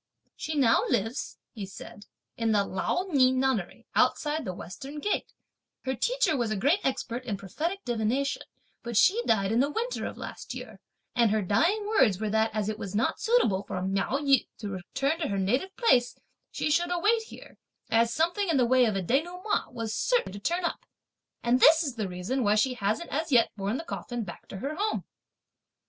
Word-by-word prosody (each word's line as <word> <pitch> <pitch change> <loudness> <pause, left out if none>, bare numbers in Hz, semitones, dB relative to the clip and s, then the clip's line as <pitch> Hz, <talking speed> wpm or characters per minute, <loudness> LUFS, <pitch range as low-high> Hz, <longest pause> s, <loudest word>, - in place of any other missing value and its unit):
She 315 - -4
now 255 -6 +4
lives," 225 +7 -1 0.2
he 205 -4 -6
said, 200 +1 -11 0.3
"in 225 -1 +1
the 205 -1 +3
Lao 195 - -1
Ni 260 -4 +5
nunnery, 260 -7 -1
outside 300 -1 +1
the 185 - -2
western 275 - -8
gate; 415 +8 -2 0.5
her 260 - 0
teacher 435 - +1
was 240 -4 0
a 215 - -1
great 285 - +2
expert 255 -2 -2
in 220 -5 -3
prophetic 320 - -4
divination, 240 +4 0 0.4
but 235 -3 -3
she 420 - +5
died 200 -2 +2
in 230 - +2
the 280 +3 +3
winter 470 +10 -2
of - - -8
last - - -7
year, - - -9 0.4
and 235 -2 +4
her 215 0 +1
dying 335 - +2
words 255 - +3
were 215 -1 -2
that 220 +1 +2
as 215 -1 -2
it 215 0 -3
was 200 -3 -5
not 225 +4 +1
suitable 445 - +2
for 185 - -5
(Miao 195 +7 0
Yü) 275 -2 +3
to 210 - -5
return 270 - -2
to 320 - -1
her 200 - -2
native 250 - 0
place, 250 - +3 0.3
she 305 - -2
should 345 +3 +2
await 420 +6 +2
here, 445 - -13 0.3
as 230 +1 +3
something 345 - 0
in 320 - +3
the 250 - +4
way 255 +1 +4
of 215 -3 0
a 195 - -1
denouement 350 - -1
was 230 -3 -4
certain - - +1
to 200 - -8
turn 345 - -1
up; 420 - -3 0.6
and 240 +2 +3
this 320 +4 +7
is 280 -5 -2
the 215 -5 -3
reason 180 +9 -2
why 205 0 +3
she 250 +4 +2
hasn't 220 +8 -2
as 310 +2 -2
yet 235 -3 +5
borne 205 +3 -2
the 325 - -5
coffin 240 -7 -5
back 175 -4 -10
to 195 - -8
her 275 +10 -3
home!" 425 +1 -1
250 Hz, 200 wpm, -28 LUFS, 215-320 Hz, 0.6 s, this